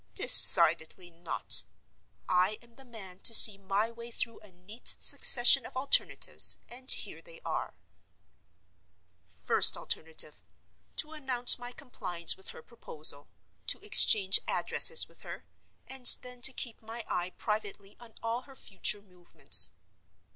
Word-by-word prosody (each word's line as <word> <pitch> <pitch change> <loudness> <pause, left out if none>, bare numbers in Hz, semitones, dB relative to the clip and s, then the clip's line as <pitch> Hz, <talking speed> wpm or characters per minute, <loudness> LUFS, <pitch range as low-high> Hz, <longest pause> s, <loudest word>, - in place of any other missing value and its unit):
Decidedly 175 +2 +6
not: 170 0 -4 0.6
I 185 +4 -3
am 235 0 -25
the 270 - -20
man 195 -7 -16
to 230 - +2
see 205 -3 +7
my 200 +3 -5
way 235 0 -13
through 230 0 -5
a 210 - -22
neat 185 +7 -17
succession 240 -1 +3
of - - -13
alternatives; 270 +2 0
and 255 +2 -6
here - - -3
they - - -19
are: - - -9 1.5
First - - +1
alternative: - - -7 0.5
To 310 - -8
announce 260 -6 0
my 245 0 -12
compliance 185 - -8
with 190 - -15
her - - -15
proposal; 150 -10 -5 0.4
to - - -3
exchange 200 - +4
addresses 475 0 -1
with - - -18
her; - - -13 0.4
and 265 -2 -5 0.2
then 250 -1 -13
to 265 - +3
keep 240 -3 -7
my 225 +1 -12
eye 175 0 -6
privately 205 -2 -9
on 235 -2 -19
all 230 +2 -6
her 270 - -17
future 205 -2 -5
movements. 180 - 0
225 Hz, 135 wpm, -26 LUFS, 190-245 Hz, 1.5 s, see